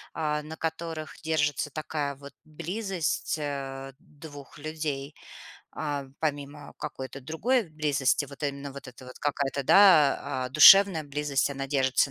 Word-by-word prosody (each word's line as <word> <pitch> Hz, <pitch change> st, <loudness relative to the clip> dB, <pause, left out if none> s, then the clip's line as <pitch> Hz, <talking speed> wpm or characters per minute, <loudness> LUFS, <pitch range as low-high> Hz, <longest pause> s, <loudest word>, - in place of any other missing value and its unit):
а, 150 Hz, -2 st, -1 dB
на 155 Hz, +1 st, -9 dB
которых 160 Hz, -1 st, -5 dB
держится 150 Hz, -2 st, 0 dB
такая 150 Hz, -1 st, -4 dB
вот 140 Hz, +1 st, -13 dB
близость, 170 Hz, +2 st, -3 dB
а, 135 Hz, -2 st, -5 dB
двух 145 Hz, -2 st, -13 dB
людей. 150 Hz, -2 st, -4 dB, 0.6 s
А, 145 Hz, -3 st, -4 dB
помимо 145 Hz, -1 st, -4 dB
какой-то 135 Hz, -2 st, -7 dB
другой 195 Hz, -, 0 dB
близости, 145 Hz, -3 st, 0 dB
вот 140 Hz, +2 st, -13 dB
именно 140 Hz, -1 st, -4 dB
вот 140 Hz, -1 st, -10 dB
эта 125 Hz, +1 st, -13 dB
вот 125 Hz, -, -12 dB
какая-то, 140 Hz, -1 st, -1 dB
да, 155 Hz, -8 st, +5 dB
а, 125 Hz, -, -3 dB
душевная 165 Hz, +4 st, +8 dB
близость, 145 Hz, -2 st, -1 dB
она 135 Hz, 0 st, -4 dB
держится 135 Hz, 0 st, +1 dB
145 Hz, 135 wpm, -27 LUFS, 140-155 Hz, 0.6 s, душевная